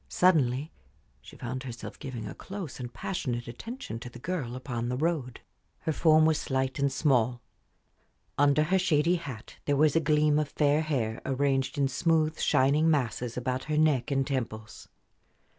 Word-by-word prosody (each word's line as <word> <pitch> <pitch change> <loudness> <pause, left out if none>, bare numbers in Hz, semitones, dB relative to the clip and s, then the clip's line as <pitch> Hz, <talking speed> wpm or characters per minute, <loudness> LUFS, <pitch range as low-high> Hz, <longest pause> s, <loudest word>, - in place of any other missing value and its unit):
Suddenly 150 -5 +2 0.5
she - - -13
found 130 +2 -4
herself 120 -3 -8
giving 125 -6 -6
a - - -6
close 190 -9 -7
and 120 -1 -6
passionate 125 -10 -3
attention 125 - -7
to 125 - -8
the 120 - -12
girl 130 -4 -3
upon 120 -2 -4
the 125 - -1
road. 145 -5 -1 0.4
Her 160 - -1
form 155 0 +5
was 160 -1 +3
slight 130 0 -1
and 140 0 +2
small; 125 -4 +2 1.0
under 145 +1 +4
her 190 +5 +2
shady 170 0 +2
hat 135 -10 -9
there 145 -1 +1
was 150 0 +4
a - - +6
gleam 150 -1 +3
of 150 -2 -1
fair 150 +1 +2
hair 125 -8 -2
arranged 135 +1 0
in 140 -1 +3
smooth, 155 +2 +1
shining 145 +5 +3
masses 125 -5 -1
about 130 +1 -2
her 155 0 -1
neck 150 -4 +3
and 135 -1 +1
temples. 115 -5 -4
140 Hz, 165 wpm, -28 LUFS, 125-155 Hz, 1.0 s, a